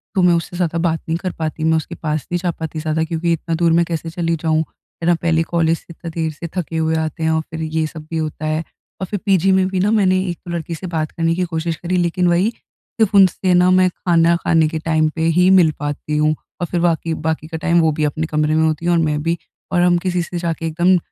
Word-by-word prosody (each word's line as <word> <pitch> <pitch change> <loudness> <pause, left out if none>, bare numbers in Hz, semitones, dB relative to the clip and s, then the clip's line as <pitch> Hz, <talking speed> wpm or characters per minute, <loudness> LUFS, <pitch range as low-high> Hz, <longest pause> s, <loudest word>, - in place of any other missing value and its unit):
तो 190 - +3
मैं 180 -1 +5
उससे 170 +1 -2
ज़्यादा 170 -2 0
बात 165 -1 0
नहीं 165 +1 0
कर 180 +1 -3
पाती, 155 0 -3
मैं 160 0 +3
उसके 160 - -5
पास 155 -2 -3
नहीं 175 - 0
जा 175 0 -1
पाती 160 -1 -6
ज़्यादा 155 0 -1
क्योंकि 165 +1 -1
इतना 165 0 -2
दूर 165 0 +2
मैं 170 - +3
कैसे 165 -1 -4
चली 165 -1 -1
जाऊँ, 160 -1 +2
है 165 +1 -10
ना। 175 - +5
पहले 165 -1 +2
कॉलेज 165 0 +1
से - - -20
इतना 170 0 -8
देर 160 -1 -1
से 155 +3 -7
थके 165 -2 -2
हुए 160 0 +1
आते 160 +1 -2
हैं 160 - +2
और 160 0 +1
फिर 160 0 -5
ये 160 0 -1
सब 155 -1 -10
भी 165 - -3
होता 155 -1 -3
है। 155 +1 -1 0.4
और - - 0
फिर 205 +2 -3
पीजी 195 -1 +3
में 190 0 +3
भी 190 -1 -2
ना 200 +3 +2
मैंने 190 -4 +3
एक 175 - -4
तो 175 - -6
लड़की 170 0 -4
से 185 +4 -7
बात 160 -3 -2
करने 165 0 0
की 185 - 0
कोशिश 165 +1 -1
करी, 175 +4 -2
लेकिन 175 +1 +1
वही, 175 +5 +3 0.5
सिर्फ़ 210 -2 +2
उनसे 185 -1 +4
ना 180 +1 +5
मैं 185 0 +4
खाना 170 -1 +2
खाने 160 -1 +3
के 160 0 -3
टाइम 155 -1 +1
पे 160 - -3 0.2
ही 180 +1 +5
मिल 180 -4 +6
पाती 145 +1 -3
हूँ। 155 +1 +2 0.3
और 175 - -1
फिर 175 - -1
बाकी 165 -1 +1
बाकी 160 0 -2
का 160 0 -5
टाइम 170 +1 +2
वो 160 -1 +3
भी 155 +1 -2
अपने 155 +2 -1
कमरे 155 0 +1
में 160 - +3
होती 160 +1 -1
है 175 - +2
और 170 - +3
मैं 150 -2 0
भी। 170 +1 0 0.3
और 175 -1 +2
हम 175 0 +4
किसी 180 0 -1
से 175 +2 -6
जाके 165 -1 -3
एकदम 175 +3 +3
165 Hz, 265 wpm, -19 LUFS, 160-175 Hz, 0.5 s, मिल